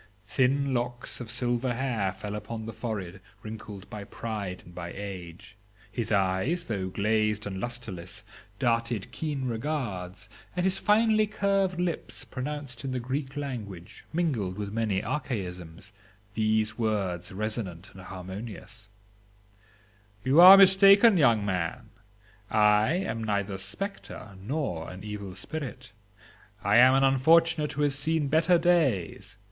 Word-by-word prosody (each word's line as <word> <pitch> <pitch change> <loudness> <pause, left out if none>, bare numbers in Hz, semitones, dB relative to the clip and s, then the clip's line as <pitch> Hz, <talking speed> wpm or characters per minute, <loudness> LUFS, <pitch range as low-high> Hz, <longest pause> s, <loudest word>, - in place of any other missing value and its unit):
Thin 135 +5 +1
locks 120 0 -2
of 120 - -7
silver 125 0 0
hair 115 -7 -1
fell 100 +2 -7
upon 110 +1 -6
the 115 - -6
forehead 105 -5 -5 0.2
wrinkled 110 -2 -8
by 105 -1 -7
pride 100 -3 -5
and 85 - -14
by 85 -1 -6
age; 95 -2 -8 0.4
his 110 +1 -3
eyes, 100 - +1
though 100 -5 -3
glazed 105 +1 0
and 95 -2 -4
lustreless, 110 -8 -5 0.3
darted 115 -4 0
keen 145 -4 -3
regards, 110 -7 -4 0.3
and 180 - 0
his 190 0 +1
finely 215 0 +3
curved 195 -3 0
lips 175 -2 -3
pronounced 135 -2 -5
in 135 -1 -3
the 130 - -1
Greek 135 +3 -4
language, 105 -11 -6
mingled 125 - -1
with 100 -1 -5
many 110 -4 0
archaisms, 95 - -5 0.4
these 110 +1 0
words 95 -6 -1
resonant 100 -3 -4
and 95 - -11
harmonious:—'You 105 - -5
are 190 +2 +12
mistaken, 195 +3 +7
young 120 - +4
man, 100 +4 -3 0.6
I 105 +4 +4
am 120 -12 -2
neither 100 -2 -1
a - - -4
spectre 105 - -5
nor 115 - -3
an 90 +1 -9
evil 100 -3 -6
spirit; 130 +2 -6 0.7
I 100 +3 +4
am 130 +2 +7
an 135 - +3
unfortunate 155 +3 +4
who 150 - -1
has 145 -1 +2
seen 150 +1 0
better 165 +4 +4
days. 125 - +1
110 Hz, 130 wpm, -28 LUFS, 100-140 Hz, 0.7 s, are